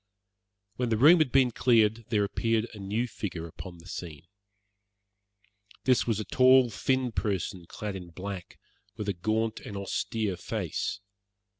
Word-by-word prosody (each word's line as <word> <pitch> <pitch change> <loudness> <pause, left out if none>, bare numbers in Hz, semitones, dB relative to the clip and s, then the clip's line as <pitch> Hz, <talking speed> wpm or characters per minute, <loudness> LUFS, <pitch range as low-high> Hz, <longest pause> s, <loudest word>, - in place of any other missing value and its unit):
When 125 -1 0
the 110 - +2
room 155 +9 +7
had 155 -5 +2
been 130 -2 +4
cleared 115 -2 +3
there 105 -2 +2
appeared 115 +2 0
a 105 - -10
new 105 +5 -1
figure 90 -7 -5
upon 85 +2 -9
the 85 - -16
scene. 85 -4 -7 1.6
This 130 -2 +3
was 110 -3 +1
a 110 - -3
tall, 130 +2 +5
thin 130 +2 0
person 95 -5 -2
clad 105 +2 -5
in 90 -2 -7
black, 95 +1 -7 0.4
with 105 -2 -4
a 100 - +1
gaunt 110 +5 -1
and 100 - -7
austere 100 0 -2
face. 100 - -3
110 Hz, 150 wpm, -28 LUFS, 95-120 Hz, 1.6 s, room